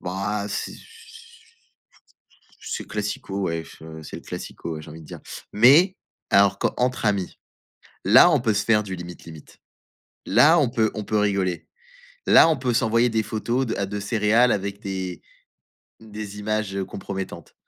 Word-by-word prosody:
Bah, 100 +3 -3
heu, - - -5
c'est 100 - -4
ce - - -13 1.8
c'est - - -5
classico, 100 -1 -4
ouais, 85 -2 -2
che 80 -1 -12
c'est - - -8
le - - -11
classico, 85 - -7
ouais, 75 - -7
j'ai 75 - -12
envie 80 - -10
de - - -14
dire - - -10 0.3
mais 145 - +6 0.3
alors 100 0 +4
qu'entre 125 -1 -1
amis, 100 -3 -1 0.7
là, 175 - +7
on 150 - +3
peut 115 -3 +1
se 100 0 0
faire 105 -2 +3
du 95 -2 -5
limite, 85 -1 -10
limite, 80 -3 -13 0.7
là, 145 - +5
on 145 -5 +3
peut 110 -3 +1
on 105 - -5
peut 110 - 0
rigoler. 100 -4 -1 0.6
Là, - - +7
on 160 - +2
peut 125 -2 -1
s'envoyer 115 0 +2
des 110 -1 0
photos 115 +4 -2
de, - - -2
heu, 100 - -1
de 105 +1 -5
céréales 110 +3 +3
avec 100 +1 -3
des 95 -4 -5 0.8
des 105 -2 -8
images, 110 -1 -2
heu, 95 -1 -2
compromettantes. 95 -3 -7
105 Hz, 170 wpm, -23 LUFS, 95-115 Hz, 1.8 s, là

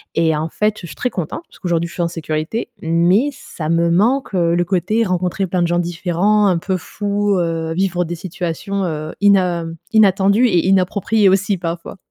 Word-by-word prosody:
Et 165 -1 +2
en 155 +1 -2
fait, 210 +5 0
je - - -8
suis - - -10
très 250 - -1
contente 180 - -4
puisqu'aujourd'hui 170 -2 -2
je - - -12
suis 175 - -2
en - - +1
sécurité, 165 +6 -3
mais 175 - +3
ça 155 - -7
me 170 +1 +2
manque, 220 +9 +1
heu, 170 -2 +2
le 175 - +2
côté, 200 +5 +1
rencontrer 185 +1 -1
plein 180 0 0
de - - +1
gens 175 +1 +1
différents, 175 +4 +1
un 185 -3 +2
peu 185 +2 -2
fous, 205 +4 -1
heu, 165 -1 -2
vivre 180 0 0
des 175 +1 -4
situations, 180 +3 -4
heu, 155 -2 -4
ina 185 -4 +3 0.3
inattendues 200 +1 +4
et 180 -5 +2
inappropriées 195 +2 +2
aussi 195 +1 +1
parfois. 170 +2 -5
180 Hz, 190 wpm, -18 LUFS, 170-200 Hz, 0.3 s, inattendues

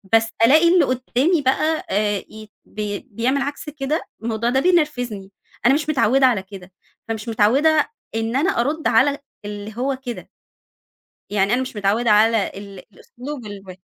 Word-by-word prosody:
بس 225 0 +3 0.2
ألاقي 315 +7 +5
اللي 360 - +5
قدامي 255 +6 +1
بقى، 305 +4 0
آآ، 205 0 +1
ي 215 -1 -12 0.2
بي 210 -1 -4
بيعمل 255 +6 0
عكس 285 +2 -4
كده، 295 +1 -2 0.2
الموضوع 230 +1 -1
ده 265 +2 +2
بينرفزني، 250 - 0 0.3
أنا 265 - +6
مش 305 +1 -1
متعوّدة 265 -1 +3
على 230 -7 +2
كده، 190 -1 -12 0.4
أنا 225 - 0
مش 220 +2 -7
متعوّدة 275 +9 +3 0.3
إن 225 +1 -2
أنا 310 +8 +2
أرد 305 +5 -1
على 285 +2 +3 0.3
اللي 205 +1 -7
هو 265 +1 -1
كده. 240 - -6 1.0
يعني 205 +2 +2
أنا 255 - 0
مش 255 - -7
متعوّدة 210 +3 +1
على 215 0 +4
ال 200 -1 -10 0.2
الأسلوب 255 -1 -9
الو 195 -2 -9
240 Hz, 160 wpm, -21 LUFS, 210-280 Hz, 1.0 s, أنا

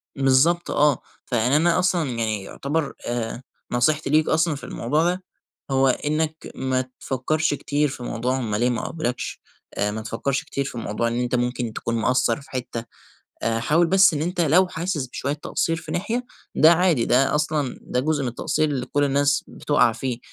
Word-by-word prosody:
بالضبط 135 +6 +3
آه، 145 -3 +3 0.2
فيعني 125 +3 +1
أنا 170 +3 +3
أصلًا 175 -6 +1
يعني 110 -4 -2
يُعتبَر 145 +7 -3
آآ 120 0 -3 0.3
نصيحتي 140 +5 +1
ليك 155 +1 +3
أصلًا 160 -1 +2
في - - -10
الموضوع 150 +7 0
ده، 180 +2 0 0.5
هو 135 0 +3
إنك 155 +4 0 0.2
ما 130 -1 0 0.2
تفكرش 145 +4 0
كتير 145 +1 0
في 130 -2 -7
موضوع 125 +2 -1
هم 110 -5 -2
ليه 120 +4 +2
ما 120 - -2
قبلوكش، 125 -7 -3 0.3
آآ 105 +1 0
ما 110 +1 -4
تفكرش 115 +5 -2
كتير 140 - -3
في 135 - -6
موضوع 115 +1 -1
إن 120 +1 -1
أنت 125 0 -1
ممكن 120 -1 -1
تكون 115 - -3
مقصر 125 +5 +2
في 145 +3 -17
حتّة، 120 -3 -4 0.6
حاول 120 +10 +2
بس 190 0 +5
إن 150 - -1
أنت 175 +1 -2
لو 175 +4 +4
حاسس 165 -6 -2
بشوية 140 +3 -3
تقصير 165 +2 -1
في 160 - -7
ناحية، 230 +7 -1 0.3
ده 160 +2 +7
عادي، 170 -8 +3
ده 135 +3 +3
أصلًا 150 -3 -1
ده 125 - -1
جزء 145 +1 0
من 130 - -1
التقصير 150 +5 0
اللي 130 -3 -2
كل 145 0 +1
الناس 140 +1 +2
بتقع 145 -6 +2
فيه، 125 0 -3
140 Hz, 180 wpm, -23 LUFS, 125-155 Hz, 0.6 s, ده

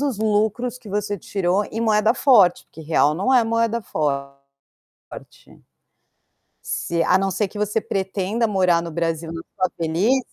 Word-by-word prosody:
os 275 -7 -1
lucros 220 +3 0
que 230 -4 -14
você 205 0 -2
tirou 195 +3 -1
em 225 - -4
moeda 215 +1 +2
forte, 210 -10 +4
porque 160 - -14
real 150 -1 +2
não 200 +10 0
é 245 - +6
moeda 230 0 0 1.1
forte. - - -15 1.1
Se 170 0 -2
a 185 - +4
não 195 0 0
ser 210 +2 0
que 205 +2 -10
você 210 +1 0
pretenda 195 +4 -2
morar 180 -4 +2
no 170 - -6
Brasil 165 0 -2
na 165 - -6 0.2
sua 185 -2 0
velhice 175 +11 +1
205 Hz, 155 wpm, -21 LUFS, 175-225 Hz, 1.1 s, é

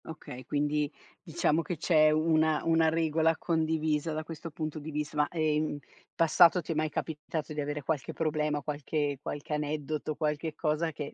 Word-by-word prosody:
Okay, 130 -5 -9
quindi 150 +1 0 0.3
diciamo 160 -2 +1
che 170 0 -4
c'è 155 -1 +4
una 155 0 +2
una 165 -1 +4
regola 160 0 +2
condivisa, 160 -1 0
da 155 +1 -3
questo 165 +1 -7
punto 155 0 -4
di 150 +1 -7
vist 150 0 -3
ma, 150 -1 +2
ehm, 155 -2 +1
in 145 - -6 0.4
passato 170 +2 +6
ti 165 - -5
è - - -1
mai 155 0 +1
capitato 155 0 -4
di 150 - -2
avere 145 0 -3
qualche 150 -1 -2
problema, 150 -2 -1
qualche 145 -1 -2
qualche 145 +1 -5
aneddoto, 150 0 -2
qualche 150 0 -2
cosa 160 +1 0
che 145 -1 -6
155 Hz, 175 wpm, -30 LUFS, 150-160 Hz, 0.4 s, passato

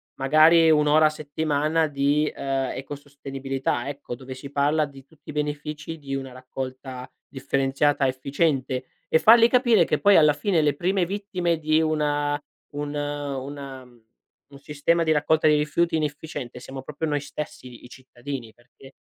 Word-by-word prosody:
magari 155 +4 +5
1 150 -1 +3
ora 155 +1 +5
a - - +5
settimana 155 +1 -1
di, 145 +1 +1
ehm, 135 -1 -2
ecosostenibilità 135 -2 -4
ecco, 140 -3 -7
dove 130 +1 -9
si 135 +2 -10
parla 145 +2 +2
di 135 -2 -14
tutti 155 +1 -20
i - - -5
benefici 150 +1 -4
di 135 -2 -5
una 135 -1 -5
raccolta 130 0 -7 0.2
differenziata 140 +1 0
efficiente, 130 -1 -1 0.2
e 160 - +3
fargli 230 +4 +7
capire 240 -8 +4
che 150 - 0
poi 200 0 +5
alla 150 -2 +6
fine 160 +3 +1
le 145 -1 +2
prime 185 +3 0
vittime 180 -3 -2
di 155 0 +2
una 145 -2 0 0.3
un 145 0 -4
una 140 -2 -5
mhmm, 120 -2 -21 0.5
un 140 - -13
sistema 150 +4 0
di 160 - +1
raccolta 155 +1 +2
di 150 - +5
rifiuti 160 +3 0
inefficiente, 145 -4 -4
siamo 130 +1 -8
proprio 150 +3 -5
noi 145 -1 0
stessi, 145 -2 -7
i 120 -2 -13
i - - -13
cittadini. 130 -2 -8
Perché 125 +2 -18
145 Hz, 160 wpm, -24 LUFS, 135-155 Hz, 0.5 s, fargli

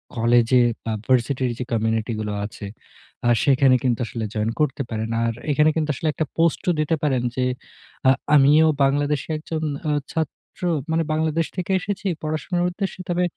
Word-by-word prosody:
কলেজে 120 +1 +4 0.2
বা 115 - -1
ভার্সিটির 130 0 +1
যে - - -1
কমিউনিটি 110 0 0
গুলো 105 -1 -3
আছে, 105 0 -8 0.6
আ - - +5
সেখানে 135 -2 +5
কিন্তু 125 -3 +1
আসলে 115 0 -4
জয়েন 105 +1 0
করতে 145 -2 0
পারেন। 110 0 -3 0.2
আর 115 - 0 0.2
এখানে 150 +2 +4
কিন্তু 155 -2 -1
আসলে 160 - -3
একটা 155 - -1
পোস্টও 165 +2 +2
দিতে 155 +2 +1
পারেন 135 -4 +1
যে 130 - 0 0.6
আ - - +8 0.2
আমিও 150 +3 +6 0.2
বাংলাদেশে 145 +1 +1
একজন 155 +1 -5 0.5
ছাত্র 160 -3 -5 0.3
মানে 165 +1 +2
বাংলাদেশ 160 +1 0
থেকে 180 +1 -2
এসেছি 200 +1 -4 0.2
পড়াশোনার 155 +3 -1
উদ্দেশ্যে। 190 +1 -4
তবে 175 +1 +1
140 Hz, 155 wpm, -22 LUFS, 120-160 Hz, 0.6 s, আ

